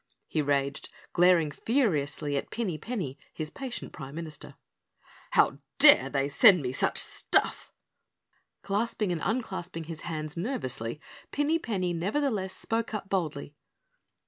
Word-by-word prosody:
he 155 - 0
raged, 140 -1 -1 0.2
glaring 175 -3 +4
furiously 150 - 0
at 140 - -2
Pinny 215 -8 -2
Penny, 165 - -4
his 155 -1 -5
patient 265 +1 -6
Prime 140 -1 -8
Minister. 160 -3 -8 0.7
"How - - +3 0.2
dare 135 - +8
they 135 -1 0
send 180 - +6
me 125 - -1
such 135 - 0
stuff?" - - 0 0.9
Clasping 210 -1 0
and 170 -3 -2
unclasping 185 -7 -2
his 160 0 -7
hands 155 -2 -4
nervously, 150 - -3 0.3
Pinny 295 +3 +1
Penny 185 - -1
nevertheless 200 - -1
spoke 225 -1 -2
up 200 -2 -5
boldly. 150 -7 -2
170 Hz, 125 wpm, -29 LUFS, 145-220 Hz, 0.9 s, dare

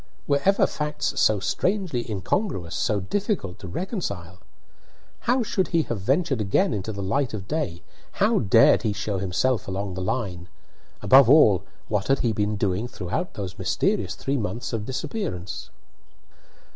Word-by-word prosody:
Were 140 -1 +1
ever 195 +1 +5
facts 150 0 -2
so 110 -2 +4
strangely 180 - -1
incongruous, 100 - -2
so 105 -2 0
difficult 185 - -2
to 95 - -8
reconcile? 95 - -4 0.9
How 250 0 +3
should 190 -4 0
he 165 -2 +2
have 115 -7 -4
ventured 135 - +1
again 140 - +2
into 105 +1 -3
the 100 -2 -5
light 120 +5 0
of 95 -3 -7
day? 95 - -3 0.3
How 210 +2 +2
dared 115 +1 +5
he 110 -3 0
show 100 -1 -2
himself 100 +7 0
along 95 0 -3
the 95 - -5
line? 90 -4 -3 0.6
Above 130 -2 +7
all, 105 - +6 0.2
what 105 -2 -1
had 135 0 +2
he 115 -2 +1
been 105 0 0
doing 100 +2 -1
throughout 110 - -4
those 95 -3 -6
mysterious 95 - 0
three 140 +1 -2
months 120 +2 -3
of 110 -2 -3
disappearance? 130 - -4
110 Hz, 155 wpm, -25 LUFS, 95-150 Hz, 0.9 s, Above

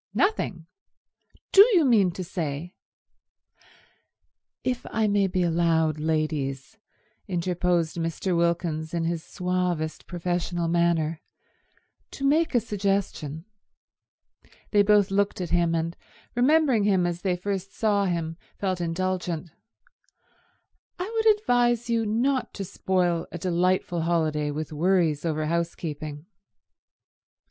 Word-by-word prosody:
"Nothing? 205 - 0 0.9
Do 390 - +9
you 330 -4 +5
mean 215 -8 +4
to 185 - -5
say—" 170 -1 -4 1.9
"If 255 -1 -1
I 220 0 +1
may 200 -1 +2
be 185 -1 0
allowed, 165 -2 +2
ladies," 155 +1 -2 0.5
interposed 175 -2 0
Mr. 165 +2 -1
Wilkins 170 -1 0
in 170 - 0
his 165 -1 -2
suavest 180 -4 -2
professional 175 -1 -2
manner, 165 -2 +1 0.9
"to 275 - -5
make 310 +1 +2
a - - +6
suggestion"—they 200 0 -4
both 205 -1 +4
looked 200 0 +1
at 180 -2 -4
him, 170 -1 +2
and 165 +1 -2 0.4
remembering 265 -2 +3
him 190 -3 +3
as 175 0 -2
they 185 -2 0
first 195 +1 -4
saw 205 -2 +1
him 165 -3 -2 0.2
felt 185 -3 -2
indulgent— 175 -1 -2 1.5
"I 365 +5 -4
would 445 0 +1
advise 240 - +1
you 225 -1 +1
not 250 +5 0
to 195 - -4
spoil 180 -3 0
a - - -5
delightful 180 0 0
holiday 155 -3 0
with 155 +1 -4
worries 165 -2 +2
over 155 -1 -1
housekeeping." 155 -2 -3
175 Hz, 115 wpm, -26 LUFS, 165-200 Hz, 1.9 s, Do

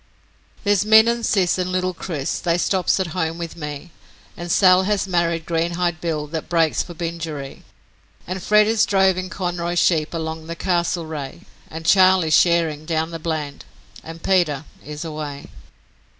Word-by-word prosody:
'There's 205 -2 +2
Min 220 +1 +6
and 235 0 0
Sis 190 -5 +1
and 185 0 -2
little 185 0 -1
Chris, 160 -5 -4
they 170 0 0
stops 185 +1 +1
at 190 - 0
home 165 -2 -2
with 170 -1 -6
me, 150 +1 -7 0.4
And 175 0 -6
Sal 185 0 +5
has 200 0 0
married 170 -2 0
Greenhide 170 0 -1
Bill 155 -3 -2
that 155 +1 -6
breaks 165 -2 +2
for 175 - -8
Bingeree. 160 -4 -5 0.6
And 185 +1 -5
Fred 210 +3 +4
is 220 0 +2
drovin' 190 -2 +2
Conroy's 175 -2 -3
sheep 165 -2 +2
along 160 0 -5
the 170 - -5
Castlereagh, 165 -6 -2 0.3
And 160 +1 -8
Charley's 185 -3 +4
shearin' 160 -2 +2
down 160 0 -1
the 165 - -6
Bland, 155 -3 -4 0.4
and 165 0 -10
Peter 160 -6 +1 0.2
is 150 +2 -7
away.' 150 -3 -6
170 Hz, 155 wpm, -21 LUFS, 160-185 Hz, 0.6 s, Min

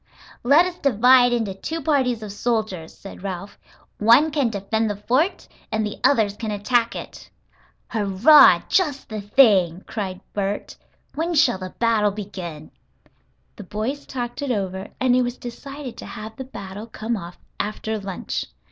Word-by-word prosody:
"Let 285 +8 +5
us 360 -1 -5
divide 250 0 +5
into 225 -5 -1
two 320 +12 -5
parties 265 -7 +1
of 210 - -6
soldiers," 210 -6 -2
said 195 - -12
Ralph. 195 +1 -6 0.4
"One 235 +9 +5
can 285 -5 +1
defend 220 +1 -1
the 205 - -2
fort 255 - 0 0.2
and 220 0 0
the 210 - -6
others 215 -7 +3
can 220 +1 -5
attack 230 +3 +1
it." - - -9 0.6
"Hurrah! 215 +8 +6
just 300 -8 0
the 215 -2 -4
thing!" 200 -6 +4
cried 190 -4 -4
Bert. 200 0 -3 0.4
"When 335 +3 -2
shall 260 -10 +3
the 185 -1 -8
battle 225 -3 +2
begin?" 185 -7 -7 0.9
The 205 - -8
boys 220 +9 -4
talked 245 0 -5
it 285 - -3
over, 190 -4 -2
and 255 -1 +3
it 255 - +4
was 245 0 -2
decided 275 +2 -8
to - - -8
have 220 -1 -8
the 265 - -7
battle 205 -3 -8
come 225 +1 -3
off 175 -3 -8 0.2
after 215 +1 -3
lunch. 195 -2 -4
220 Hz, 155 wpm, -22 LUFS, 200-255 Hz, 0.9 s, Hurrah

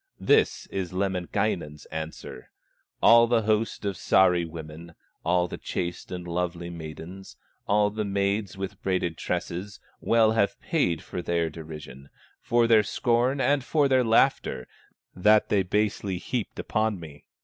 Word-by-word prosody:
This - - +2
is 95 -2 -3
Lemminkainen's 90 -5 -2
answer: 80 -5 -7 0.5
"All 115 0 +7
the 115 -1 +2
host 110 0 0
of 100 -2 -1
Sahri 90 -3 +3
women, 80 +1 -10 0.3
All 90 +1 +2
the - - -7
chaste 85 -1 -4
and 90 -1 -6
lovely 85 0 -3
maidens, 85 +3 -9 0.3
All 105 0 +3
the 110 +1 -2
maids 100 0 -1
with 95 0 -6
braided 90 -3 -1
tresses, 95 +6 -4 0.2
Well 115 -1 +3
have 105 -3 +1
paid 140 - 0
for 90 - -5
their 85 -2 -1
derision, 75 -4 -10 0.3
For 120 0 +2
their 115 -2 +6
scorn 120 +5 +1
and 140 +1 +2
for 145 +1 +2
their 130 -1 +3
laughter, 115 - +2 0.5
That 105 +3 +4
they 100 - +3
basely 100 0 -1
heaped 115 +4 -4
upon 110 -3 -1
me. 75 -3 -12
95 Hz, 140 wpm, -26 LUFS, 85-110 Hz, 0.5 s, All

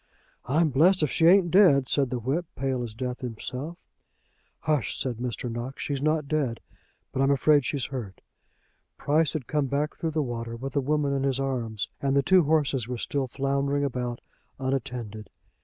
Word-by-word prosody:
"I'm 155 +5 +3
blessed 165 +6 +4
if 150 - +1
she 165 - +4
ain't 180 -1 +5
dead," 155 -9 +6
said 135 -1 +1
the 125 - -2
whip, 140 +9 -2
pale 130 -1 -1
as 115 -3 -5
death 125 0 -4
himself. 125 +7 -5 0.9
"H 150 -9 +2
sh!" - - -3
said 125 -4 -2
Mr. 125 0 -3
Knox; 120 +3 -5
"she's 140 -2 -2
not 155 -1 +1
dead, 140 -6 -1 0.5
but 135 - -1
I'm 135 - +3
afraid 140 0 +4
she's 140 -3 -1
hurt." 115 -8 -6 0.8
Price 155 +1 +2
had 155 -6 -3
come 150 0 0
back 145 +3 -1
through 165 - -2
the 155 -1 0
water 115 -2 -4
with 130 +3 -6
the 140 - +1
woman 145 +1 0
in 135 - 0
his 135 -1 0
arms, 120 -6 -2
and 135 -1 +1
the 140 - +4
two 185 +3 +5
horses 140 -6 +1
were 125 0 -3
still 135 +3 -2
floundering 140 +2 0
about, 125 -3 -3 0.4
unattended. 125 -5 -4
135 Hz, 185 wpm, -27 LUFS, 125-150 Hz, 0.9 s, dead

